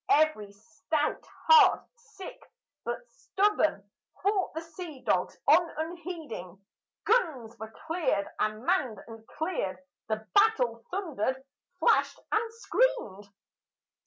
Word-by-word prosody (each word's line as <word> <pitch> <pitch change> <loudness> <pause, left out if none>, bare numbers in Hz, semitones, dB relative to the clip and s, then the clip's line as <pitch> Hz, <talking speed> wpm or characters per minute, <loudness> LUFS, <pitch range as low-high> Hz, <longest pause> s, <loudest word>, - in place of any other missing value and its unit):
Every 295 -10 +3
stout 300 +7 -2 0.2
heart 445 -6 +7
sick 440 -5 -11 0.4
but - - -4
stubborn, 385 - 0 0.4
fought 400 -1 +1
the 320 - -2
sea 330 -4 -9
dogs - - +1
on 335 +3 +6
unheeding, 315 - -6 0.5
Guns 305 - +1
were 220 0 -6 0.2
cleared 320 - 0
and 215 +2 -1
manned 300 - +1
and 225 -1 -12
cleared, 305 - -3 0.3
the 220 0 -2
battle 255 - +3
thundered, 265 - -2 0.4
flashed, - - +3
and 450 +1 +1
screamed. 460 - 0
315 Hz, 105 wpm, -29 LUFS, -, 0.5 s, heart